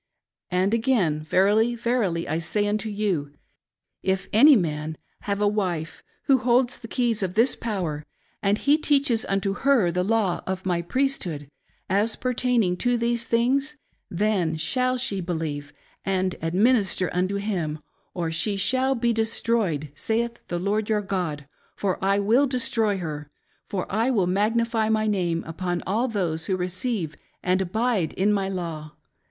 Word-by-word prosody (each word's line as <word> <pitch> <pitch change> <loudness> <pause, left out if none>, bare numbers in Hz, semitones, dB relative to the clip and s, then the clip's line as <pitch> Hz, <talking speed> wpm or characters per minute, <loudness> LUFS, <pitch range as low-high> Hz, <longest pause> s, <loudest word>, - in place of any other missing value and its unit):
And 185 +3 +1
again, 220 - +1
verily, 205 +8 +3
verily 230 -8 0
I 160 +2 -1
say 205 +5 -1
unto 215 +1 -1
you, 185 -9 -2 0.7
if 190 0 -1
any 280 +7 +8
man 155 -5 -1 0.3
have 200 0 0
a 205 - +3
wife 180 -6 -2 0.2
who 270 -2 +4
holds 245 0 +2
the 230 - -9
keys 235 -3 0
of 185 -1 -2
this 230 +4 +4
power, 180 -10 -3 0.4
and 200 +1 +2
he 290 +6 +3
teaches 280 -6 +2
unto 195 0 0
her 245 -7 +3
the 180 +1 0
law 205 -3 +1
of 190 0 -3
my 175 -2 +1
priesthood, 175 - -2 0.4
as 205 +4 +1
pertaining 245 -7 +1
to 245 +4 +1
these 235 0 0
things; 270 +6 +1 0.3
then 185 -4 0
shall 255 +11 0
she 210 -7 0
believe 160 -4 -4 0.3
and 185 -1 0
administer 190 +2 +2
unto 185 +2 0
him, 185 -7 -2 0.4
or 170 -3 -2
she 200 +5 0
shall 260 +7 +2
be 235 -1 +1
destroyed, 220 -9 0
saith 230 +8 -2
the 175 - -2
Lord 205 +4 -1
your 210 -1 +1
God; 170 -7 -3 0.3
for 190 -1 -2
I 195 +1 +3
will 230 +8 +3
destroy 230 -5 0
her; 150 -4 -5 0.4
for 185 -3 -2
I 225 +5 0
will 210 -8 +2
magnify 220 +4 +1
my 220 0 +2
name 175 -5 0
upon 175 +2 -3
all 220 +7 +1
those 175 -8 -2
who 190 - 0
receive 185 - -2 0.3
and 185 +1 +2
abide 205 -2 0
in 205 +3 +2
my 195 -1 0
law. 165 -5 -5
200 Hz, 155 wpm, -25 LUFS, 175-230 Hz, 0.7 s, any